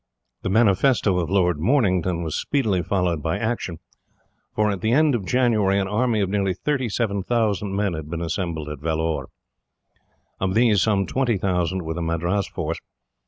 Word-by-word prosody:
The - - -2
manifesto 105 -1 +3
of 85 -2 -2
Lord 90 -5 +2
Mornington 95 - +1
was 80 -2 -4
speedily 110 -11 0
followed 90 -3 0
by 80 +2 -1
action, 110 -7 -2 0.8
for 105 0 +2
at 100 - -4
the 110 +1 +1
end 155 +1 +4
of 105 -7 -2
January 110 -6 +2
an 95 -1 0
army 110 +1 +1
of 95 - 0
nearly 95 -2 0
37,000 110 -5 -1
men 100 -2 0
had 80 -2 -6
been 85 0 -4
assembled 85 -2 -3
at 75 -2 -6
Vellore. 80 +1 -1 1.1
Of 95 0 -1
these 110 -4 +4
some 100 -3 +2
20,000 95 -6 0
were 80 0 -3
the 85 - -4
Madras 85 +4 -1
force. - - -4
95 Hz, 160 wpm, -23 LUFS, 85-110 Hz, 1.1 s, end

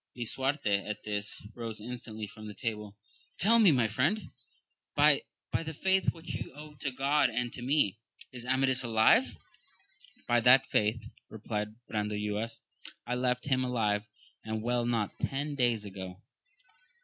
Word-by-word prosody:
Lisuarte 120 -4 0
at 105 - -4
this, 105 -1 -3
rose 115 -2 -5
instantly 110 -1 -6
from 105 +1 -9
table; 105 -3 -4 0.2
— - - -33
Tell 225 +6 +5
me, 205 -6 +7
my 125 -5 +3
friend, 140 - 0 0.6
by - - +6 0.3
the 160 -1 -2
faith 190 +3 +2
which 165 0 -8
you - - -5
owe 150 +1 -10
to 140 - -1
God 140 +3 +2
and 120 +1 -2
to - - -7
me, 125 -6 +2 0.3
is 125 -2 -8
Amadis 130 0 +2
alive 110 -2 +5
1 - - -6 0.9
By 120 0 +4
that 125 +3 +7
faith, 110 +2 +1 0.3
replied 105 -1 -4
Brandoyuas, 105 +1 -2 0.4
I 125 - -2
left 125 0 0
him 130 -2 +2
alive 110 -4 0 0.4
and 110 0 -3
well 120 0 +1
not 115 -4 -1
ten 145 +2 -2
days 120 -6 +1
ago 95 -2 -7
120 Hz, 150 wpm, -31 LUFS, 105-135 Hz, 0.9 s, me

